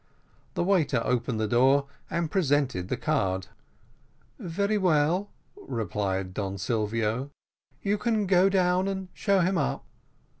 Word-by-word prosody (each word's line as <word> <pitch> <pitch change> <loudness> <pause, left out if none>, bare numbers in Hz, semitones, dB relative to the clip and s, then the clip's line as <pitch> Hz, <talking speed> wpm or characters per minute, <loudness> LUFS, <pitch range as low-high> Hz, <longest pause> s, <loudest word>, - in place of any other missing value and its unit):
The - - +1
waiter 175 -9 +2
opened 120 -2 0
the 110 - 0
door, 135 +5 +4 0.2
and 170 -2 -2
presented 140 - +1
the 125 - -2
card. 95 - -1 0.9
"Very 200 +5 -1
well," 180 +1 +2 0.3
replied 100 -6 -3
Don 100 0 -3
Silvio, 110 +5 -1 0.5
"you 205 +1 +1
can 220 -3 +1
go 190 0 +4
down 185 -1 +2
and 190 -1 -4
show 200 -2 +2
him 180 0 +1
up." 145 - -2
145 Hz, 125 wpm, -27 LUFS, 115-190 Hz, 0.9 s, door